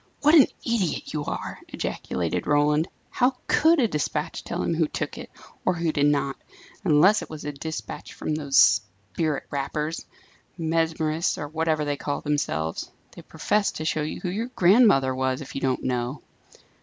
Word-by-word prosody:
"What 300 +2 +5
an 300 -5 +8 0.2
idiot 220 -8 -1
you 150 -1 -2
are!" - - -5
ejaculated 85 -2 -3
Roland. 150 +2 +3 0.2
"How 250 +1 +2
could 320 +1 +4
a 240 - +4
despatch 150 -7 -2
tell - - -3
him - - 0
who 160 -1 +1
took - - -4
it, - - -9 0.3
or 185 - +1
who 165 -1 0
did 145 -1 +2
not? 140 -2 +1 0.5
unless 180 +8 +5
it - - -8
was 155 -2 -8
a 150 - -2
despatch 155 +3 -6
from 155 - -3
those 145 -3 0 0.6
spirit 150 - -1
rappers 150 +3 -3 0.5
mesmerists, 160 0 0
or 145 - -4
whatever 155 0 0
they 145 -1 -1
call 145 0 -3
themselves. 80 - -2 0.2
They - - -11
profess 210 -1 0
to 155 - -5
show 155 0 0
you 150 - -4
who 180 - -2
your 215 +6 -2
grandmother 180 - +5
was, 130 0 -1
if 140 - -9
you 135 - -4
don't 130 -1 0
know!" 125 +2 -2
155 Hz, 170 wpm, -25 LUFS, 145-170 Hz, 0.6 s, an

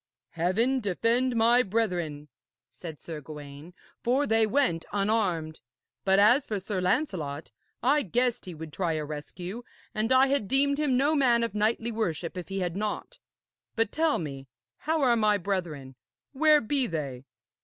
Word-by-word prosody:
'Heaven 220 +11 +1
defend 235 +5 +1
my 235 +2 +5
brethren,' 180 -9 -2 0.4
said 160 -4 -9
Sir 160 -3 -7
Gawaine, 150 +3 -10 0.3
'for 260 +4 +2
they 225 -3 +3
went 215 -9 +1
unarmed. 195 -7 0 0.4
But 190 0 +3
as 240 +8 +5
for 210 -2 -2
Sir 190 -1 -3
Lancelot, 180 - -1 0.3
I 285 +4 +4
guessed 245 - 0
he 180 -3 -7
would 155 -1 -9
try 170 -1 -1
a 155 -1 -2
rescue, 175 +8 -7 0.3
and 215 +3 -1
I 260 +1 +6
had 275 -6 0
deemed 280 +3 +2
him 280 -4 +2
no 285 +4 +3
man 245 -5 +3
of 230 - -2
knightly 220 +2 0
worship 175 -7 -2
if 180 0 -7
he 195 0 -3
had 175 -1 -2
not. 215 - -4 0.6
But, 225 -3 +1
tell 320 -1 +2
me, 135 -4 -6 0.3
how 315 -1 0
are 245 -2 +4
my 215 -2 +3
brethren. 175 -9 -3 0.4
Where 300 +1 +4
be 265 +2 0
they?' 140 - -5
210 Hz, 160 wpm, -28 LUFS, 165-250 Hz, 0.6 s, I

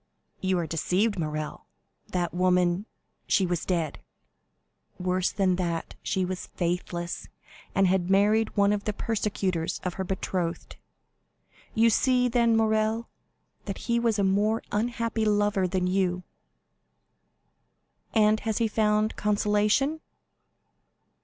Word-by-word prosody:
"You 190 -1 +1
are 170 - -1
deceived, 185 +6 0
Morrel, 155 -1 -4 0.4
that 175 -2 -2
woman——" 180 +2 +2 0.4
"She 195 - +3
was 175 -2 -2
dead?" 170 -5 -1 1.0
"Worse 185 0 0
than 190 -3 +1
that, 170 -3 -2
she 190 -1 0
was 185 0 -5
faithless, 175 0 -3 0.5
and 195 - +4
had 185 -1 +1
married 210 +3 +3
one 200 0 +4
of 205 -1 -3
the 210 - -1
persecutors 195 -6 -1
of 180 - -2
her - - 0
betrothed. 180 -2 -3 1.0
You 230 +1 +5
see, 250 +2 +3
then, 235 -1 +3
Morrel, 220 +1 +1 0.6
that - - -4
he 235 0 0
was 230 -2 +1
a 200 - +1
more 205 +3 +2
unhappy 230 +1 -1
lover 205 -2 +2
than 180 0 -1
you." 180 -1 0 1.9
"And 215 0 +4
has 220 -1 -2
he 230 - +2
found 215 0 +1
consolation?" 210 +8 +1
200 Hz, 120 wpm, -27 LUFS, 180-220 Hz, 1.9 s, You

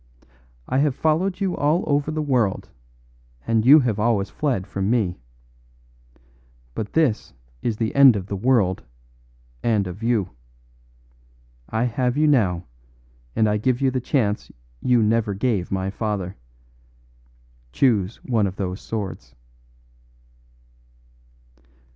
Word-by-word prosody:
I 130 - +1
have 145 -2 +1
followed 170 +6 0
you 190 -3 -1
all 150 +5 +1
over 145 +1 0
the 155 0 -2
world, 125 -9 0 0.8
and 115 -1 +1
you 145 +5 +8
have 115 -5 -1
always 105 -3 +1
fled 130 -11 -1
from 95 0 -3
me. 105 - 0 1.5
But 105 - -5
this 150 - 0 0.3
is 115 -3 -2
the 110 -1 -1
end 135 -4 +7
of 95 -3 -3
the 100 - -4
world 100 -4 +2 0.8
and 110 -4 +1
of 90 +3 -7
you. 115 -5 0 1.4
I 110 +1 0
have 125 +1 0
you 155 - +3
now, 100 - +2 0.7
and 110 - +3
I 105 0 +1
give 125 +3 0
you 135 -1 +2
the 130 0 -2
chance 115 -5 -1 0.3
you 125 -3 +3
never 110 -1 +1
gave 100 -4 -1
my 95 0 -1
father. 100 -4 -3 1.4
Choose 105 - +1
one 110 -5 +1
of 95 - -6
those 95 0 -4
swords." 95 - -6
115 Hz, 125 wpm, -23 LUFS, 100-130 Hz, 1.5 s, you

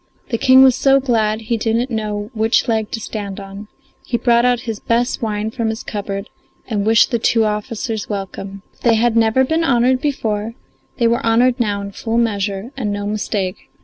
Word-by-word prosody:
The 230 - -1
King 260 0 +7
was 260 -2 +6
so 270 +1 +4
glad 225 -4 0
he 230 +1 -1
didn't 230 +3 -1
know 210 -1 -3
which 225 +3 +1
leg 220 -2 0
to 225 - -4
stand 205 -2 -6
on; 200 +1 -9 0.4
he 235 - -1
brought 235 0 +3
out 245 -1 +2
his 225 -3 -5
best 240 +3 0
wine 215 -1 -2
from 230 -2 -2
his 220 0 -4
cupboard 200 -1 -5 0.4
and 210 -3 -1
wished 225 -1 +4
the 235 - +1
two 225 0 +2
officers 215 +1 -3
welcome. 195 -1 -6
If - - -31
they 235 -2 +3
had 230 +1 +2
never 230 +3 +3
been 320 +5 0
honoured 255 -2 +2
before 225 -6 -2 0.4
they 235 - +1
were 235 +1 +1
honoured 240 +3 +3
now 205 -4 0
in 200 - -6
full 225 +3 -3
measure, 205 -1 -1
and 230 -7 -2
no 205 0 -3
mistake. 205 -2 -3
225 Hz, 195 wpm, -18 LUFS, 210-240 Hz, 0.4 s, King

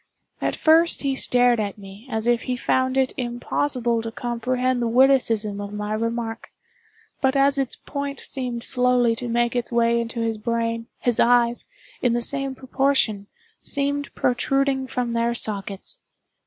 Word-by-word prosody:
At - - 0
first 325 +1 +4
he 275 -1 0
stared 245 -2 +3
at 205 -1 -3
me 200 +4 -12
as 220 -2 -1
if 240 -1 +2
he 250 - +1
found 260 +1 0
it 265 -1 +2
impossible 240 -1 -1
to 225 0 -5
comprehend 245 +2 -1
the 235 - 0
witticism 230 -5 +3
of 200 0 -6
my 210 0 -3
remark; 230 0 -3 0.7
but 265 0 +2
as 275 0 +3
its 265 -3 0
point 280 -1 -5
seemed 245 -3 -2
slowly 250 -2 +2
to 245 +1 -4
make 240 0 0
its 245 0 0
way 235 0 +2
into 230 0 -4
his 225 -1 -2
brain, 230 0 -2
his 245 -2 0
eyes, 240 0 +3 0.4
in 245 -2 +2
the 240 - +1
same 275 +2 -3
proportion, 260 -6 0 0.3
seemed 285 0 -2
protruding 265 +1 +1
from 245 -2 -2
their 235 0 0
sockets. 200 - -2
240 Hz, 155 wpm, -23 LUFS, 230-265 Hz, 0.7 s, first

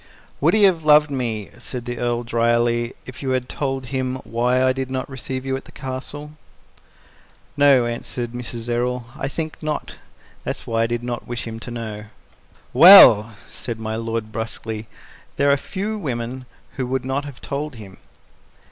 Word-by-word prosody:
"Would - - +3
he 215 - +4
have 180 -5 +4
loved 150 0 +5
me," 115 -6 -3
said 125 -2 -6
the 120 -1 -4
Earl 120 0 -1
dryly, 120 0 +1
"if 130 - -9
you 135 - -3
had 125 -1 -6
told 135 -2 -3
him 130 -1 -1
why 125 +3 +1
I 130 0 +3
did 130 0 -4
not 130 0 -3
receive 130 0 -5
you 135 0 -1
at 135 - -7
the - - -14
Castle?" 140 +3 -6 1.2
"No," 140 -4 +5
answered 120 0 -4
Mrs. 120 -1 -7
Errol, 120 +1 -1
"I 135 - -3
think 155 +2 -5
not. 155 -1 -4 0.5
That - - -2
was - - -12
why 115 0 0
I 115 - +2
did 120 0 -3
not 120 -1 -4
wish 120 -1 -4
him 115 -1 -6
to 120 - -8
know." 110 -3 -6 0.7
"Well," 120 - +9
said 115 -2 -6
my 110 0 -3
lord 115 -1 -3
brusquely, 110 -1 -5 0.5
"there 140 0 +4
are - - +5
few 205 +8 -4
women 125 - -4 0.3
who 130 -2 -1
would 130 0 -2
not 135 +2 -1
have 140 -3 -9
told 145 0 -4
him." 100 -4 -11
125 Hz, 175 wpm, -22 LUFS, 115-135 Hz, 1.2 s, Well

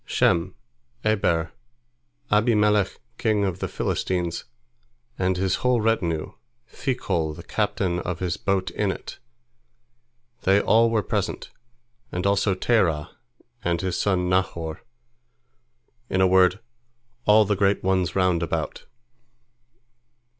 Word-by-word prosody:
Shem, 85 +2 +1 0.5
Eber, 85 -7 +1 0.8
Abimelech 105 -2 +3 0.2
king 105 -3 +2
of 95 -2 -3
the - - -2
Philistines, 90 -2 -2 0.7
and 95 0 +1
his 95 0 +1
whole 125 -1 +2
retinue, 90 -8 0 0.3
Phicol 90 - -2
the - - -10
captain 90 -2 -1
of 90 -1 -3
his 90 -2 -2
host 95 -2 0
in 105 +3 -1
it—they 120 -1 -5
all 115 +1 +4
were 110 -2 +1
present, - - -3 0.6
and 90 +1 -3
also 100 0 +2
Terah 90 -8 +1 0.5
and 85 -1 0
his 95 -2 -2
son 90 -3 +1
Nahor, 85 -3 -1 1.3
in 95 - 0
a 95 - +5
word, 95 +1 +4 0.7
all 105 +1 +6
the 105 +1 +1
great 100 0 +1
ones 95 -2 +1
round 90 -3 +2
about. 85 - -3
95 Hz, 110 wpm, -24 LUFS, 90-110 Hz, 1.3 s, all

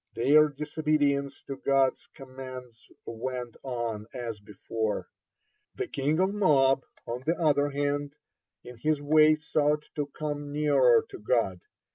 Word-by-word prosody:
Their 150 +6 +5
disobedience 145 -1 -1
to 135 - -6
God's 135 -1 +1
commands 130 -3 -10 0.2
went 120 +1 -5
on 120 -5 -4
as 115 -4 -5
before. 105 +2 -4 0.7
The 400 - -3
king 145 - 0
of 190 +2 +2
Moab, 135 -9 +3 0.2
on 120 +2 -4
the 165 - +2
other 145 -3 +2
hand, 145 0 -2 0.5
in 125 -1 -11
his 155 +4 0
way 155 +1 +5
sought 150 -1 0
to 145 -1 -1
come 145 0 -5
nearer 140 -5 +4
to - - -9
God. 105 -5 0
140 Hz, 130 wpm, -28 LUFS, 125-150 Hz, 0.7 s, Their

